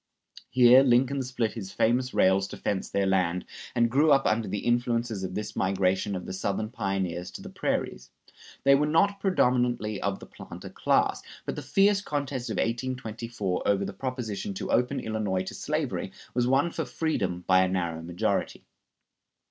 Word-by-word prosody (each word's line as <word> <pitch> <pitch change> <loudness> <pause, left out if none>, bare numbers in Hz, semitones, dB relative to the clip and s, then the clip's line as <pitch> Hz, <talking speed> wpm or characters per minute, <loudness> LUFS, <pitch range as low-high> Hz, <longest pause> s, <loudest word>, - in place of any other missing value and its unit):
Here 125 +1 +7
Lincoln 135 +1 +3
split 125 -3 -2
his 95 -5 -7
famous 125 +3 +1
rails 95 +1 +3
to - - -9
fence 95 -2 -2
their 100 0 0
land, 90 -2 +1 0.3
and 120 -1 +4
grew 145 +6 +3
up 135 -1 +4
under 110 0 +1
the 105 - -4
influences 120 -3 0
of 95 - -4
this 105 - -4
migration 95 +1 +1
of 90 - -5
the 95 - -6
Southern 100 +3 -2
pioneers 95 -6 -2
to - - -9
the - - -9
prairies. 60 +1 -2 0.5
They 140 - +6
were 145 +2 +3
not 200 +6 +2
predominantly 125 - +1
of 100 0 -1
the - - -11
planter - - -10
class; - - +1 0.2
but - - -3
the - - -5
fierce 200 0 +3
contest 140 -7 -3
in - - -2
1824 115 -5 -2
over 100 -1 +2
the - - -5
proposition 130 - -4
to - - -4
open 125 +1 +1
Illinois 105 -4 -1
to - - -7
slavery - - -2 0.2
was 125 0 +1
won 140 +6 +2
for - - -2
freedom 95 - -2
by 95 0 +5
a 95 - +3
narrow 85 -3 -2
majority. 85 +1 -2
115 Hz, 170 wpm, -27 LUFS, 95-130 Hz, 0.5 s, Here